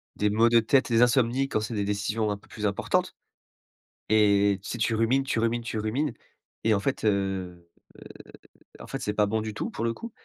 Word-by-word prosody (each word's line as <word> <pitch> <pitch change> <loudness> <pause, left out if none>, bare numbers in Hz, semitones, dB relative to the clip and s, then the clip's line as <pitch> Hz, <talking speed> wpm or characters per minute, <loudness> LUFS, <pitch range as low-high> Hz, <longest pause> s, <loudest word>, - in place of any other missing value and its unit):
des 105 - +1
maux 110 +3 +3
de 120 0 +5
tête, 130 +4 +2
des 115 0 +3
insomnies 125 +2 +2
quand - - 0
c'est 110 +2 -4
des 105 - -1
décisions 105 +2 -1
un 100 - -3
peu 100 - -22
plus 105 -1 -6
importantes. 100 - 0 0.9
Et, 100 -2 +3
si 105 - -5
tu 115 0 0
rumines, 115 +5 +2
tu 130 -4 -1
rumines, 115 +1 0
tu 110 -1 -4
rumines 125 +8 -1 0.5
et 110 - +3
en 100 - +2
fait, 130 +5 -2
heu 95 -4 -1 1.1
en - - -10
fait 135 - -5
c 130 - -1
'est - - -7
pas 105 0 +2
bon 110 +2 -1
du 110 -1 -5
tout - - -4
pour 115 - -5
le 115 0 0
coup. 230 - -9
110 Hz, 215 wpm, -26 LUFS, 105-120 Hz, 1.1 s, de